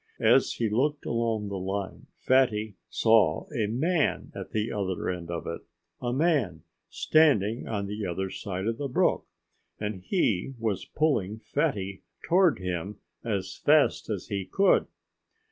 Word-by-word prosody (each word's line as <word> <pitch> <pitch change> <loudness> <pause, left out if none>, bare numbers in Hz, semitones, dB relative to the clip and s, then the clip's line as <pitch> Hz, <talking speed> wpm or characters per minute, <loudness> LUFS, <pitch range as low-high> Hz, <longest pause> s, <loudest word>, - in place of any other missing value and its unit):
As 135 - +5
he 115 - -1
looked 140 +7 0
along 115 -3 -1
the 100 -1 -4
line 95 +1 -4
Fatty 110 -5 +2 0.2
saw 110 -8 +3
a 110 -3 +1
man 155 - 0
at - - -7
the 110 +1 -1
other 95 -4 -2
end 85 -2 -6
of 85 -1 -4
it 85 - -5 0.4
a 120 -1 -1
man, 130 - +1 0.3
standing 120 -8 +3
on 100 -3 -2
the 105 +2 -4
other 95 +2 -3
side 95 -2 -4
of 115 0 -1
the 145 - -2
brook! 125 - +1 0.5
And 105 -3 -4
he 130 - 0
was 110 -5 -2
pulling 110 -10 0
Fatty 110 -7 -2 0.2
toward 175 -2 +4
him 90 +2 -4 0.3
as 100 -5 -2
fast - - +3
as - - -4
he 100 -1 -2
could. 195 - +3
110 Hz, 145 wpm, -27 LUFS, 95-130 Hz, 0.5 s, As